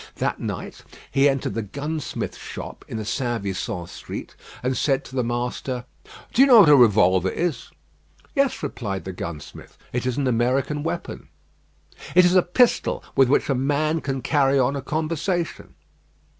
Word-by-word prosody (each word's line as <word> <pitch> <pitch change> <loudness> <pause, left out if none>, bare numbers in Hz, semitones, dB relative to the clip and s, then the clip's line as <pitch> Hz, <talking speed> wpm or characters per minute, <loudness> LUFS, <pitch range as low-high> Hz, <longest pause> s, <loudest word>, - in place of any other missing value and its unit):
That - - -2
night - - -6 0.3
he 140 +1 +4
entered 135 -1 -1
the 115 - -2
gunsmith's 145 +7 -5
shop - - -8
in - - -5
the 110 - -4
St. 120 -1 -2
Vincent 95 -2 -4
Street, - - -8 0.3
and 130 +1 0
said 135 0 +1
to 130 - -11
the 125 - +1
master: 120 +1 -3 0.5
"Do 255 - +4
you 275 - +8
know 240 -5 +9
what 170 - +6
a 145 - +9
revolver 95 -7 +4
is?" 170 - -2 0.6
"Yes," 275 - +1
replied 105 -9 -4
the 95 - -5
gunsmith. 85 -4 -8 0.2
"It 125 +1 -1
is 130 - -1
an 140 - 0
American 130 +4 +1
weapon." 165 - -5 0.9
"It 180 0 +7
is 180 - +4
a 185 - +6
pistol 230 +8 +2
with 135 -2 +5
which 140 - +2
a 140 - +2
man 145 +4 0
can 135 -2 -3
carry 140 -2 +3
on 130 +1 +2
a 140 - -3
conversation." 160 +4 -2
135 Hz, 170 wpm, -23 LUFS, 120-155 Hz, 0.9 s, know